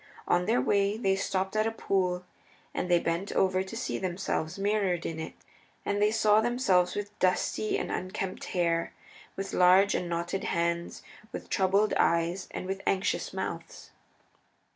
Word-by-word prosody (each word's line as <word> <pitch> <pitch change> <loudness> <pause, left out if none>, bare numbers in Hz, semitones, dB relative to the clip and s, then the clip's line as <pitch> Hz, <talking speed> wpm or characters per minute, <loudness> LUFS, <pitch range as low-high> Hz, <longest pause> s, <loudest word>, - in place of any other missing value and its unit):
On 175 +1 +2
their 230 +3 +3
way 200 +1 +2
they 195 -4 +2
stopped 190 0 -1
at 215 +1 +2
a - - 0
pool 180 -4 -1 0.5
and 180 - -2
they 175 - +6
bent 170 +3 -1
over 185 -1 +2
to 190 +4 -6
see - - -2
themselves 175 -3 -2
mirrored 195 -3 0
in 160 -1 -3
it, 160 - -6 0.5
and 205 0 0
they 210 - +5
saw 215 -1 +4
themselves 220 -7 +2
with 205 0 -4
dusty 185 +3 +1
and - - -3
unkempt 185 +1 -4
hair, 170 -2 0 0.4
with 195 0 -5
large 185 +2 +5
and 175 - -2
knotted 170 +3 -2
hands, 170 0 -1 0.3
with - - -8
troubled 200 +2 +3
eyes, 170 +3 +1
and - - -5
with 195 +1 -3
anxious 195 0 0
mouths. - - -6
190 Hz, 160 wpm, -29 LUFS, 175-200 Hz, 0.5 s, they